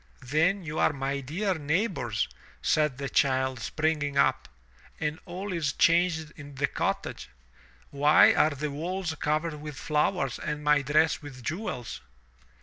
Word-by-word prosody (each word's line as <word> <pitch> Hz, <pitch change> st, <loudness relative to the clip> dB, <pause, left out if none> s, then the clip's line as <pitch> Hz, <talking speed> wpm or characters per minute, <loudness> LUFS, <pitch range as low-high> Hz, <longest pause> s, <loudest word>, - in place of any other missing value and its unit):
"Then 165 Hz, +9 st, +1 dB
you 155 Hz, -1 st, -4 dB
are -, -, +4 dB
my 140 Hz, 0 st, -2 dB
dear 175 Hz, +9 st, -1 dB
neighbors," 160 Hz, -, -1 dB, 0.4 s
said 150 Hz, -4 st, +2 dB
the 140 Hz, 0 st, -3 dB
child 130 Hz, -2 st, +1 dB
springing 150 Hz, +3 st, -1 dB
up. -, -, +2 dB, 0.5 s
"And 150 Hz, +2 st, -2 dB
all 185 Hz, +2 st, -5 dB
is 155 Hz, -5 st, -1 dB
changed 165 Hz, -2 st, +2 dB
in 145 Hz, -2 st, -11 dB
the 140 Hz, +1 st, +1 dB
cottage. -, -, -3 dB, 0.6 s
Why 145 Hz, +2 st, +6 dB
are 150 Hz, -, +4 dB
the 145 Hz, 0 st, -4 dB
walls 170 Hz, +3 st, -3 dB
covered 155 Hz, 0 st, -1 dB
with 150 Hz, -2 st, -7 dB
flowers 150 Hz, -2 st, 0 dB
and 150 Hz, 0 st, -4 dB
my 150 Hz, -1 st, +4 dB
dress 155 Hz, +4 st, +2 dB
with 135 Hz, -4 st, -10 dB
jewels?" 155 Hz, -, -4 dB
150 Hz, 145 wpm, -28 LUFS, 140-165 Hz, 0.6 s, Why